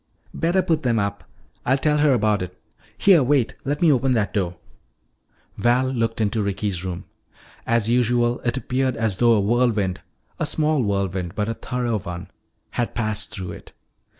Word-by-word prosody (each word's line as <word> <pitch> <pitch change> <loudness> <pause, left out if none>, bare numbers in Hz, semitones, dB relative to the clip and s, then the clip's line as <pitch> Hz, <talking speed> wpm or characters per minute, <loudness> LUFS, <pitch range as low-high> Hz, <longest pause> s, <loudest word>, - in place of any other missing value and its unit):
"Better 175 +3 +1
put 160 -2 +1
them 120 -4 +1
up. 100 -1 -2 0.4
I'll 130 +2 +2
tell 150 +1 +1
her 145 -1 +4
about 110 -5 +2
it. 90 0 -7 0.4
Here 190 -6 +6
wait, 130 -2 +2
let 145 +4 -1
me 165 - +6
open 130 -1 +2
that 105 -3 0
door." 90 -4 -1 1.0
Val 125 +4 +2
looked 115 -3 -1
into 110 0 +1
Ricky's 100 -2 -2
room. 90 0 -5 0.6
As 115 -2 +2
usual, 120 0 +2
it 120 +2 -2
appeared 130 -1 -1
as 110 -4 0
though 120 +1 +5
a 110 - +3
whirlwind, 105 -3 +1 0.4
a - - +1
small 155 -2 +2
whirlwind 95 -4 -1
but 105 +1 -1
a - - 0
thorough 120 -2 -2
one, 85 -1 -7 0.4
had 120 - -2
passed 110 -3 -2
through 95 -4 -5
it. - - -12
115 Hz, 170 wpm, -23 LUFS, 100-130 Hz, 1.0 s, Here